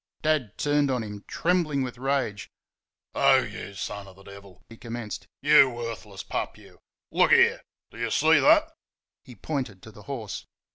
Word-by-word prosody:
Dad 150 -9 0
turned 145 -1 +1
on 125 -3 0
him, 105 -1 -8
trembling 165 -6 0
with 125 -1 -6
rage. 130 -7 -1 0.6
"Oh, - - +4
YOU 100 - -8
son 100 +1 -6
of 95 - -14
the 95 - -17
Devil!" 100 -1 -14
he 115 - -13
commenced. 115 -2 -7 0.2
"YOU 145 -2 +7
worthless 115 -5 -7
pup, - - -4
you! - - -18 0.3
Look - - +4
there! - - +5 0.3
Do - - -12
you 115 0 -1
see 160 +7 +4
that?" 315 +1 +5 0.5
(He 125 -4 -13
pointed 120 -5 -4
to 110 - -11
the 105 - -14
horse.) 115 -7 -6
120 Hz, 170 wpm, -26 LUFS, 105-145 Hz, 0.6 s, YOU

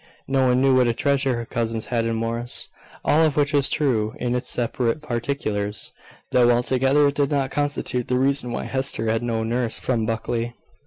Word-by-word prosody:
No 135 -1 +2
one 125 0 +3
knew 135 -1 +4
what 125 -1 +4
a 115 - 0
treasure 140 -1 +1
her 120 0 -4
cousins 115 -1 -2
had 115 -1 +1
in 115 0 -1
Morris. 115 +2 -2 0.4
All 155 - +4
of 155 -2 +1
which 145 0 +2
was 140 -2 +3
true 115 -7 0
in 125 -1 -1
its 125 0 -2
separate 120 +2 -1
particulars, 115 -6 -2 0.4
though 120 -1 +4
altogether 130 +4 +3
it - - -4
did 140 -1 +1
not 140 -2 0
constitute 145 -4 -1
the 125 - +1
reason 135 -1 +1
why - - -3
Hester 130 -4 0
had 115 - 0
no 115 -2 -1
nurse 120 +1 0
from 115 -4 -1
Buckley. 115 +1 -2
125 Hz, 195 wpm, -23 LUFS, 115-135 Hz, 0.4 s, knew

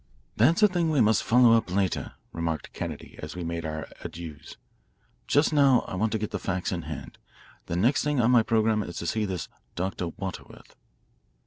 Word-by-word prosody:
"That's 160 - +4
a - - +9
thing 175 -4 0
we 150 -3 +2
must 110 -1 +4
follow 120 -1 +6
up 115 -4 +2
later," 95 0 -1 0.2
remarked 80 -2 -3
Kennedy - - -6
as - - -7
we 90 - -4
made 85 -1 -3
our 80 0 -5 0.2
adieus. 80 -3 -8 0.7
"Just 145 +2 +3
now 140 -4 +5
I - - -9
want 105 +4 0
to - - +2
get 105 -1 -4
the - - -3
facts 95 -2 -2
in 90 -2 -2
hand. 75 -4 -8 0.5
The 85 - -2
next 115 +10 +2
thing 150 -2 0
on 120 +1 +4
my 120 -2 +6
programme 110 -1 +2
is 85 -4 -6
to - - -4
see 110 +5 0
this 95 -3 -4 0.3
Dr. 90 0 -2
Waterworth." 95 +2 -8
105 Hz, 195 wpm, -27 LUFS, 85-120 Hz, 0.7 s, a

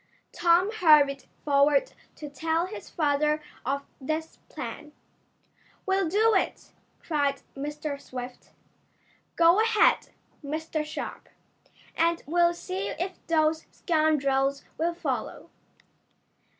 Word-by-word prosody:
Tom 350 +4 +3
hurried 300 -9 +4 0.2
forward 280 0 +3 0.2
to 300 - -8
tell 320 +4 -1
his 380 - -9
father 300 -1 +1 0.2
of 280 +3 -2 0.2
this 315 +4 -3
plan. 300 - -7 0.9
"We'll 385 -3 +1
do 435 +5 +3
it!" 380 - -1 0.3
cried 285 -4 0
Mr. 295 0 -5
Swift. 250 0 -8 0.9
"Go 340 +5 +5
ahead, 445 -1 +3 0.3
Mr. 310 +2 -3
Sharp, 305 - -7 0.7
and 335 0 +1
we'll 345 +2 +3
see 190 - -4
if 370 - -5
those 315 -1 +1
scoundrels 280 -4 +1 0.2
will 335 +1 0
follow." 350 - -4
310 Hz, 100 wpm, -27 LUFS, 280-340 Hz, 0.9 s, Go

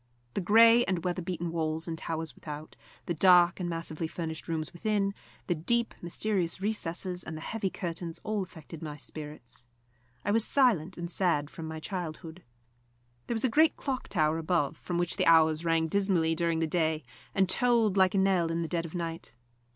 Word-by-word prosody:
The - - -1
grey 230 +5 +7
and 185 -3 -1
weather 180 0 -1
beaten 175 -1 -3
walls 160 0 -2
and 165 - -3
towers 160 -1 -4
without, 150 0 -8 0.3
the 175 - -1
dark 175 +1 +5
and 175 -1 -2
massively 165 -1 -3
furnished 160 -1 -5
rooms 160 +1 -3
within, 200 +1 0 0.3
the 175 - +1
deep, 235 +9 0
mysterious 175 0 -1
recesses 185 -3 -2
and 160 0 -6
the - - -8
heavy 210 +2 -2
curtains, 170 -2 -4
all 215 -1 -1
affected 165 -3 -9
my 150 -2 -6
spirits. 150 -6 -8 0.6
I 205 - +1
was 225 +1 +4
silent 210 - +3
and 170 0 -5
sad 165 -6 +1
from 160 - -7
my 160 0 -5
childhood. 170 -1 -6 0.9
There 235 - -1
was 225 - 0
a - - +5
great 310 +7 +4
clock 265 -3 -3
tower 155 -3 +1
above, 165 -3 0
from 175 +2 -4
which 175 -1 -1
the - - +1
hours 160 -1 +5
rang 165 -1 +2
dismally 180 -3 +2
during 165 0 0
the 165 - +1
day 160 -1 0 0.3
and 190 -1 +3
tolled 230 0 +3
like 190 0 +4
a - - +3
knell 190 -3 +3
in 165 +1 -1
the - - -3
dead 170 0 -2
of 160 - -10
night. 165 -7 -5
170 Hz, 190 wpm, -29 LUFS, 160-195 Hz, 0.9 s, grey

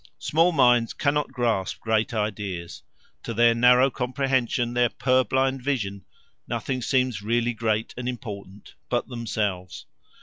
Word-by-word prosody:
Small 165 +3 +2
minds 125 -6 +3
cannot 145 -1 0
grasp 115 -7 -1
great 110 -1 0
ideas; 105 -6 -4 0.4
to 115 - -6
their 120 +1 +5
narrow 125 +3 +5
comprehension, 125 -2 -1
their 120 0 +3
purblind 130 +1 +1
vision, 105 -8 -3 0.4
nothing 130 -2 -3
seems 125 -4 0
really 120 +3 0
great 110 -1 -1
and 125 0 -4
important 105 -5 -8 0.2
but 120 -1 -1
themselves. 105 -6 -3
120 Hz, 125 wpm, -25 LUFS, 110-130 Hz, 0.4 s, their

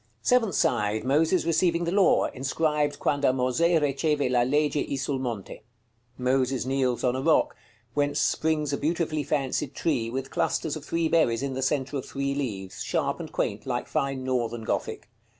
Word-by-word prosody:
Seventh 230 - +3
side. 105 -3 +1
Moses 160 +7 +2
receiving 170 +1 +2
the 170 - -1
law. 195 0 +4
Inscribed: 145 +2 -1
"QUANDO 140 -3 +1
MOSE 130 +3 0 0.2
RECEVE 145 -1 0
LA 125 -1 +3
LEGE 145 +5 +1
I 140 - -1
SUL 135 0 -2
MONTE." 120 -7 -5 0.6
Moses 130 0 +1
kneels 130 -2 0
on 125 0 +2
a 130 - -2
rock, - - +3 0.4
whence 145 +1 0
springs 155 -2 +1
a - - -1
beautifully 155 0 0
fancied 135 -1 -2
tree, 130 -9 0
with 130 +2 -4
clusters 160 -2 -1
of 155 - -7
three 165 +1 0
berries 145 -7 +2
in 140 -1 -2
the 130 - -3
centre 135 +1 0
of 130 - -5
three 140 0 -2
leaves, 105 -10 -4
sharp - - -1
and - - -7
quaint, - - -2
like - - -2
fine 135 -1 -1
Northern 120 -3 -1
Gothic. - - -3
140 Hz, 170 wpm, -26 LUFS, 130-155 Hz, 0.6 s, law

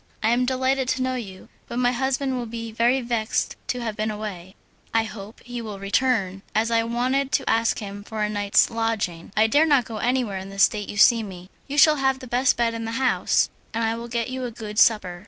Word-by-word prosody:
I 220 - +3
am 245 +1 +2
delighted 260 +1 0
to 260 0 0
know 255 0 -1
you, 200 -7 -7 0.2
but 235 - -5
my 245 0 +3
husband 265 +1 -1
will 245 -2 -3
be 230 0 -6
very 240 +4 +2
vexed 235 -2 -1
to 250 - -2
have 225 -3 -3
been 215 +1 -1
away: 205 -3 -6 0.4
"I 225 - +4
hope 215 -1 -9
he 245 -1 -6
will 220 -2 -6
soon 195 - -11
return, 200 -3 +1
as 225 +2 +1
I 230 0 +3
wanted 255 +4 0
to 270 - +1
ask 230 0 +2
him 205 -1 -7
for 215 0 -4
a - - +1
night's 205 0 +2
lodging. 225 -8 -2
I 215 - +5
dare 290 +8 +4
not 280 -6 +4
go 225 -1 -6
anywhere 240 -4 0
in 190 +1 -8
the 195 - -10
state 205 +1 +2
you 205 - -6
see 230 +2 +6
me." 185 -3 -9 0.2
"You 285 +1 -4
shall 300 +1 +6
have 265 -1 +1
the 260 - -10
best 250 +1 +2
bed 235 -1 +1
in 230 0 -4
the 225 - -4
house, 260 +1 +1 0.2
and 230 - 0
I 225 0 +1
will 230 +1 -6
get 235 +1 -2
you 260 0 -4
a 245 - -2
good 215 -2 -5
supper. 185 -6 +3
230 Hz, 240 wpm, -24 LUFS, 210-255 Hz, 0.4 s, see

